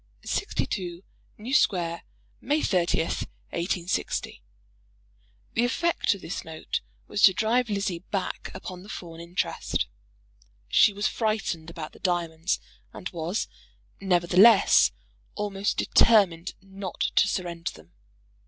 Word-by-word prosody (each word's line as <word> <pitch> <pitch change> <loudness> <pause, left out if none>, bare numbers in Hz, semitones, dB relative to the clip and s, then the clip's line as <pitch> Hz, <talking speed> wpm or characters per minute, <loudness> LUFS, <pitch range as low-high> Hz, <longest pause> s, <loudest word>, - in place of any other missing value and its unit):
62, 175 -1 -2 0.3
New 235 +5 -5
Square, 170 - +2 0.4
May 295 +4 0
30, 175 -3 +2
186 170 +2 -2 0.7
." - - -37
The 230 - +2
effect 295 -1 +1
of 195 - -12
this 165 - -5
note 160 -1 -4 0.3
was - - -2
to 190 - +8
drive 230 +4 +2
Lizzie 200 -4 -1
back 195 +1 -4
upon 185 -1 -7
the 200 - -13
Fawn 165 -5 -8
interest. 170 +2 -2 0.8
She 205 - +6
was 205 +1 -3
frightened 205 -7 -1
about 165 -2 -7
the - - -17
diamonds, 170 -1 0 0.3
and 185 - -6
was, 170 +4 -2 0.5
nevertheless, 185 - +6 0.4
almost 205 -1 -1
determined 190 -6 +4
not 195 -1 -7 0.2
to - - +6
surrender 170 -2 -2
them. 80 +2 -16
185 Hz, 115 wpm, -27 LUFS, 170-205 Hz, 0.8 s, to